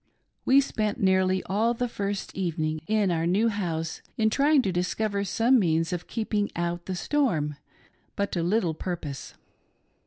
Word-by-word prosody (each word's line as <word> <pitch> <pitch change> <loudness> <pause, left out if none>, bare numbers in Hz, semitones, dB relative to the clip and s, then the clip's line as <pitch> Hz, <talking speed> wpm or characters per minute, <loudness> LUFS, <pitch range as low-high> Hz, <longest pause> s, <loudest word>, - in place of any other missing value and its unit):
We 275 +2 +6
spent 215 -4 -2
nearly 190 -2 +2
all 225 +5 +1
the 245 +1 -1
first 200 -3 -4
evening 155 -4 -2
in 210 -3 +2
our 165 0 0
new 205 +6 +3
house 165 -6 -3 0.2
in 220 -1 +2
trying 285 +2 +4
to 195 - 0
discover 200 +3 -1
:Some 235 +6 +3
means 165 -3 +1
of 175 -1 -4
keeping 215 -2 -1
out 170 0 -3
the 190 - -2
storm, 175 - 0 0.6
but 200 0 -1
to 175 - -1
little 175 -1 +1
purpose. 160 -5 -6
195 Hz, 155 wpm, -26 LUFS, 170-220 Hz, 0.6 s, We